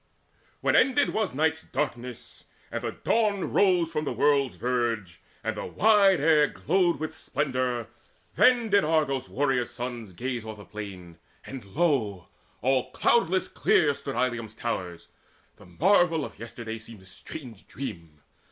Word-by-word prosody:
When - - +2
ended 275 +2 +4
was 215 -11 -1
night's 160 +2 +1
darkness, 125 -6 -5 0.3
and - - -3
the - - -3
Dawn 210 -4 0
Rose 180 -4 +3
from 155 -2 -1
the 145 - -2
world's 140 -2 +2
verge, 115 -8 -2 0.2
and - - -2
the - - -5
wide 200 -4 +4
air 150 0 +5
glowed 175 -2 +1
With 155 0 -4
splendour, 130 -5 -1 0.5
then 245 -3 +4
did 200 0 +4
Argos' 150 -4 0
warrior 135 -2 +1
sons 120 -4 -6
Gaze 120 +4 -3
o'er 110 -1 -7
the 105 -1 -12
plain; 95 -5 -9 0.3
and 135 -3 -7
lo, 110 - 0 0.3
all 130 0 +2
cloudless 190 -5 +2
clear 145 -3 +3
Stood 135 0 -6
Ilium's 120 -3 -1
towers. 90 -7 -4 0.5
The - - -16
marvel 165 - +3
of - - -11
yesterday 115 -1 -7
Seemed 110 -3 -12
a - - -18
strange 110 +4 -9
dream. 85 - -8
130 Hz, 145 wpm, -27 LUFS, 110-160 Hz, 0.5 s, air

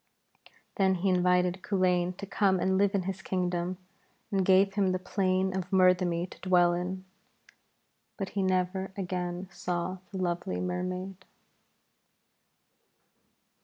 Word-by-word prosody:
Then 190 -2 +3
he 190 +2 0
invited 180 0 +2
Culain 180 -2 +1
to 200 - -6
come 195 -1 +2
and 190 +2 +1
live 200 +1 +2
in 195 - +1
his 190 +1 -4
kingdom, 180 -1 -2 0.5
and 195 -2 +2
gave 195 +1 +4
him 195 -2 +1
the - - +1
plain 185 0 0
of 185 -1 -3
Murthemny 180 -2 +3
to - - -13
dwell 175 -2 +4
in. 185 +2 -4 1.1
But 195 -3 -3
he 200 - -2
never 185 0 0
again 180 -1 -3
saw 180 +1 -3
the 195 - -6
lovely 175 0 -2
Mermaid. 185 +1 -4
185 Hz, 130 wpm, -29 LUFS, 180-190 Hz, 1.1 s, gave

